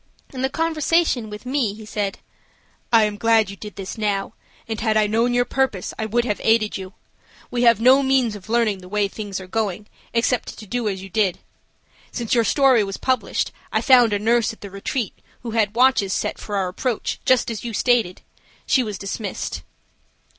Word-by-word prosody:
In 255 - -5
the 265 - +1
conversation 320 -5 +1
with 210 +3 -9
me, 250 -6 0
he 215 0 -11
said: 205 -2 -3 0.7
"I 225 -2 +6
am 210 -1 -1
glad 225 -3 +3
you - - -8
did 210 +1 -10
this 195 +3 -7
now, 205 -1 -1 0.3
and 220 -1 -3
had 220 -1 +2
I 215 - +4
known 230 +3 +1
your 245 0 +3
purpose, 260 -10 -1
I 220 - -1
would 235 +2 +1
have 210 -4 -2
aided 220 -1 +2
you. 190 -1 -7 0.6
We 245 - -1
have 235 -1 +6
no 255 +4 +6
means 265 -5 +2
of 200 0 -12
learning 225 -4 +1
the 180 0 -13
way 205 0 +1
things 200 -1 -6
are 190 - -8
going 210 0 -2 0.3
except 235 +1 0
to 215 - -10
do 235 +1 -1
as 190 -1 -5
you 195 - -9
did. 195 -3 +1 0.7
Since 235 -3 -2
your 235 -2 +4
story 260 -1 +4
was 195 -1 -4
published 260 -1 -1 0.2
I - - +2
found 245 -5 +6
a 205 - +2
nurse 230 +2 +2
at 225 - -15
the 200 - -8
Retreat 200 +3 -3 0.3
who 235 - -5
had 220 -2 +1
watches 240 -6 +3
set - - -2
for 205 - -5
our 190 -2 0
approach, 235 +5 -2
just 255 -1 +3
as 220 - -6
you 240 - -3
had 225 - -5
stated. 235 -8 +1 0.4
She 265 - +3
was 210 -5 -4
dismissed." 200 +2 -4
220 Hz, 205 wpm, -22 LUFS, 205-245 Hz, 0.7 s, I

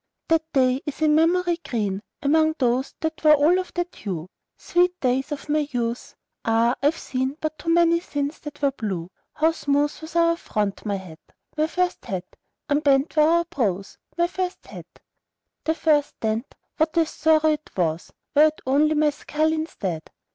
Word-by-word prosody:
That 325 -1 +4
day 260 -1 +2
is 295 +2 -3
in 305 -1 +4
memory 345 +2 +3
green 205 -4 -2 0.2
Among 315 +2 +3
those 255 0 0
that 320 0 -3
were 305 -1 +8
all 310 +6 +4
of 370 - -5
that 350 0 -2
hue; 180 -3 -5 0.3
Sweet 360 +1 +1
days 260 +2 0
of 295 - -5
my 300 -1 +1
youth! 240 -2 -3 0.3
Ah! 230 +1 +3
I've 295 +4 +2
seen 260 +2 -3
But 310 0 -4
too 335 - -4
many 335 0 +4
since 290 -3 -4
that 295 -1 -10
were 280 - +4
blue. 190 -9 -4 0.2
How 320 +2 +3
smooth 290 -1 0
was 315 +1 -10
our 335 0 +3
front, 210 - -3
my 200 - 0
hat, 185 -5 -9 0.4
My 310 0 +1
first 360 +2 -1
hat! 185 -2 -4 0.4
Unbent 285 0 +2
were 305 - +5
our 340 +1 +3
brows, 200 - -2 0.2
my 345 - +3
first 365 +1 -4
hat! - - -10 0.8
The 320 - +1
first 300 -2 +1
dent, 220 +3 -2 0.2
what 315 +1 +1
a 330 - +5
sorrow 315 0 +3
it 305 0 -4
was! 165 -2 -1 0.2
Were 300 +2 +7
it 310 - -4
only 295 +4 +3
my 300 0 +3
skull 310 +2 -1
instead! 195 - -4
295 Hz, 175 wpm, -24 LUFS, 245-320 Hz, 0.8 s, were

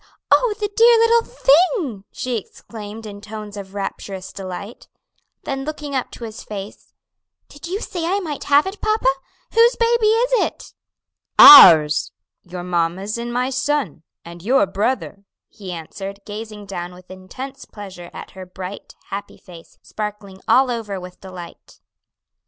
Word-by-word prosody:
Oh, 475 -4 +4
the 415 - -1
dear 465 +1 +6
little 460 +1 +4
thing!" 305 - +2
she 250 -1 -3
exclaimed 220 +1 -10
in 205 -1 -9
tones 210 -1 -8
of 200 -1 -9
rapturous 195 -1 -6
delight. 195 +3 -8 0.6
Then 270 -1 -4
looking 295 -1 -6
up 260 -2 -1
into - - -11
his 220 -1 -8
face, 205 -1 -9 0.6
"Did 290 +4 -11
you 380 +4 -3
say 345 -6 -4
I 390 +3 +1
might 310 -7 -6
have 285 +2 +4
it, 385 +2 -7
papa? 435 0 0 0.5
whose 470 +2 +5
baby 465 -1 +2
is 460 +3 +2
it?" - - -6 0.6
"Ours; 160 - +9 0.3
your 180 0 -8
mamma's 180 +5 -2
and 240 0 -5
my 250 +2 -1
son, 265 - -1 0.2
and 170 0 -11
your 240 +4 +3
brother," 200 +1 -2 0.3
he 195 -4 -9
answered, 195 +4 -7
gazing 210 0 -8
down 180 -2 -6
with 180 0 -16
intense 260 +9 -9
pleasure 190 -4 -10
at - - -10
her 185 -1 -10
bright, 185 +2 -9 0.2
happy 200 +1 -6
face, 170 -3 -15
sparkling 210 -3 -7
all 260 0 +4
over 215 -5 -4
with 180 0 -12
delight. 180 -3 -12
210 Hz, 150 wpm, -20 LUFS, 190-290 Hz, 0.6 s, Ours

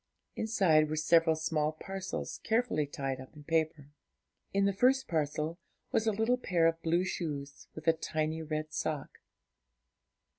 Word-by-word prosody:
Inside 175 -9 +3
were 155 - -1
several 160 +1 +4
small 155 -1 0
parcels 190 +4 -5
carefully 225 -10 +1
tied 135 -2 -3
up 130 - -13
in 150 - -12
paper. 155 -2 -1 0.6
In 200 0 +2
the 200 - +2
first 255 +6 +3
parcel 155 +1 -1 0.3
was 225 - +1
a - - +5
little 225 +4 +2
pair 175 -8 +2
of 165 0 +2
blue 170 +2 +2
shoes, 145 -6 -4
with 155 +1 -9
a 165 - +7
tiny 155 0 -2
red 155 0 -4
sock. 150 -3 -3
160 Hz, 150 wpm, -32 LUFS, 155-190 Hz, 0.6 s, a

